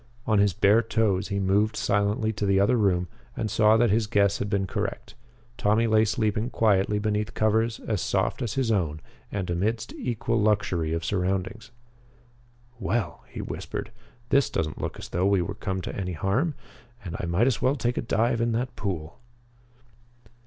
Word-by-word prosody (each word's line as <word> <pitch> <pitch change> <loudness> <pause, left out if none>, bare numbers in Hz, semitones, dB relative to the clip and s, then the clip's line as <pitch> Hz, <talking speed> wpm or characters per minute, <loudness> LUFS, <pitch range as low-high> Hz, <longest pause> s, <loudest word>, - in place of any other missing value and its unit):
On 110 -2 +3
his 100 0 +4
bare 105 +6 +4
toes, 105 -4 0
he 100 - -2
moved 100 +3 +2
silently 105 +3 +1
to 105 -1 -2
the 95 0 +3
other 100 +6 +4
room 95 -5 +2 0.3
and 110 -3 -2
saw 110 0 +5
that 120 -2 +3
his 110 0 +2
guess 100 -1 +2
had 100 - -2
been 100 -1 0
correct. 100 +1 -4 0.5
Tommy 110 +3 +3
lay 110 -1 +4
sleeping 110 +1 0
quietly 105 -3 +2
beneath 105 +1 -1
covers 110 +1 +1
as 105 -4 -2
soft - - 0
as 115 -4 -2
his 130 -4 +1
own 80 -7 0 0.3
and 95 -3 -3
amidst 105 +6 -1
equal 115 -2 -1
luxury 100 -6 +1
of 80 0 -2
surroundings. 95 +3 -2 1.1
"Well," 110 -8 -2
he - - -6
whispered, - - -5 0.4
"this 140 0 +3
doesn't 75 -1 -2
look - - -4
as - - -8
though 90 +3 +1
we 100 -3 +3
would 100 +3 -6
come 95 -1 -2
to - - -6
any 90 -2 -3
harm. 120 - 0 0.5
And 85 -1 -5
I 85 - -3
might 85 +7 +2
as 125 -7 +1
well 130 +2 +2
take 120 -2 -1
a - - -1
dive 115 +1 +1
in 115 0 +1
that 125 +3 -2
pool." 85 -6 -4
105 Hz, 180 wpm, -26 LUFS, 95-115 Hz, 1.1 s, saw